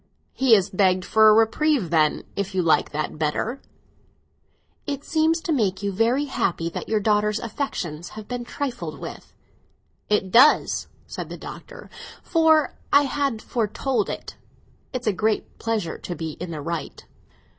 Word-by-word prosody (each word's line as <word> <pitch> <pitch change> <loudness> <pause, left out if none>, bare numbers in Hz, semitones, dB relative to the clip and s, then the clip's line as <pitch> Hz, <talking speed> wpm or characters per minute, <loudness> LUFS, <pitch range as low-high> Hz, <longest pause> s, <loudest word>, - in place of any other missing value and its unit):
"He 260 -4 +5
has 195 -2 +1
begged 185 -1 +2
for 220 0 +6
a - - +7
reprieve, 225 - +2
then, 155 -2 +2
if 200 -1 -3
you 185 - +2
like 165 - +3
that 155 0 -4
better!" 185 - -1 1.3
"It 280 -1 -3
seems 320 +1 +2
to 335 - -3
make 205 -9 0
you 200 - 0
very 230 +8 +1
happy 170 -11 -1
that - - -6
your 215 -1 +2
daughter's 210 0 +1
affections 180 - -4
have 215 -1 -8
been 245 -1 -4
trifled 255 0 -5
with." - - -9 0.8
"It 200 -3 +1
does," 265 +8 +5 0.2
said - - -7
the - - -7
Doctor; - - -10 0.4
'"for 320 -3 +3 0.2
I 285 - +6
had 275 -5 -1
foretold 240 +3 -1
it! - - -6 0.5
It's 255 -2 -4
a 215 - +2
great 215 +3 -1
pleasure 220 -7 -2
to 175 - -6
be 160 -1 -4
in 180 - -5
the 155 -3 -5
right." 165 +2 -5
215 Hz, 155 wpm, -24 LUFS, 185-270 Hz, 1.3 s, a